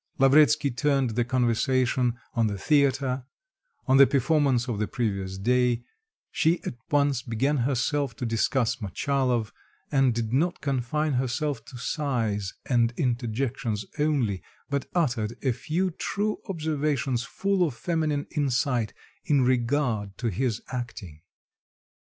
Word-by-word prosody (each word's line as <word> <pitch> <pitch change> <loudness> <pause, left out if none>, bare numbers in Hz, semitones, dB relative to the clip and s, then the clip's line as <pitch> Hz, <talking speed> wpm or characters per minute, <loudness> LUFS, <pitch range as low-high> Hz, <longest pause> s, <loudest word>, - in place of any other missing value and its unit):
Lavretsky 145 +1 +5
turned 135 -1 +1
the 120 +2 +1
conversation 125 0 +1 0.2
on 115 -3 +2
the 100 -1 -3
theater, 135 0 +2 0.6
on 130 0 +4
the 140 0 +8
performance 135 -2 +2
of 115 -5 -2
the 105 - 0
previous 100 -5 -2
day; 120 +3 +2 0.5
she 165 +2 +2
at - - -4 0.2
once 145 -4 +2
began 135 +4 0
herself 135 +1 0
to 125 - -4
discuss 115 +1 +1
Motchalov, 120 +1 0 0.4
and 135 -3 +4
did 115 -1 -2
not 170 +7 +1
confine 140 +2 -1
herself 130 0 -1
to 125 0 -10
sighs 115 -8 -2
and 120 -3 +2
interjections 120 -2 -1
only, 135 -11 +1 0.3
but 140 -1 -1
uttered 120 -9 0
a 130 - +2
few 160 +10 -1
true 205 +5 -2
observations 150 -7 -1
full 190 +7 0
of 150 -8 -1
feminine 155 -2 -1
insight 125 -5 0 0.3
in 145 -5 +3
regard 120 -5 0
to 120 - -1
his 115 +3 -1
acting. 110 - -6
130 Hz, 130 wpm, -26 LUFS, 115-145 Hz, 0.6 s, the